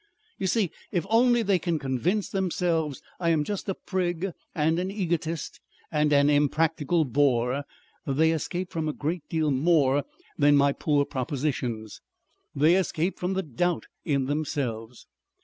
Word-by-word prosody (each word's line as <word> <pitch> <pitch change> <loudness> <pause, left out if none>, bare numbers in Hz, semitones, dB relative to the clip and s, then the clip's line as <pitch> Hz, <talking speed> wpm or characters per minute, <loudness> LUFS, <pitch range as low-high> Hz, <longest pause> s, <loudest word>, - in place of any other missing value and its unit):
You 190 - 0
see 200 -3 +1 0.2
if 175 -3 0
only 240 +1 +4
they 195 -3 +2
can 170 -1 -1
convince 150 - -1
themselves 170 -6 -1 0.2
I 170 -2 +1
am 160 -3 +3
just 200 +4 -4
a 190 - -1
prig 180 -1 -2 0.2
and 160 +1 +2
an 185 +1 -2
egotist 170 -5 -2 0.3
and 150 -1 +2
an 140 0 +5
impractical 155 +2 +2
bore, 130 0 +1 0.4
they 155 +4 +3
escape 175 +3 -3
from 160 -2 -2
a - - -2
great 155 +2 -4
deal 155 -2 +1
more 140 -1 +3 0.4
than 145 0 +5
my 140 0 +4
poor 145 -1 +1
propositions. 125 -5 -3 0.5
They 155 +4 +5
escape 180 -1 -1
from 180 +2 -1
the 190 0 -1
doubt 170 +4 -1 0.2
in 140 -3 0
themselves. 130 -6 -3
155 Hz, 150 wpm, -26 LUFS, 140-175 Hz, 0.5 s, an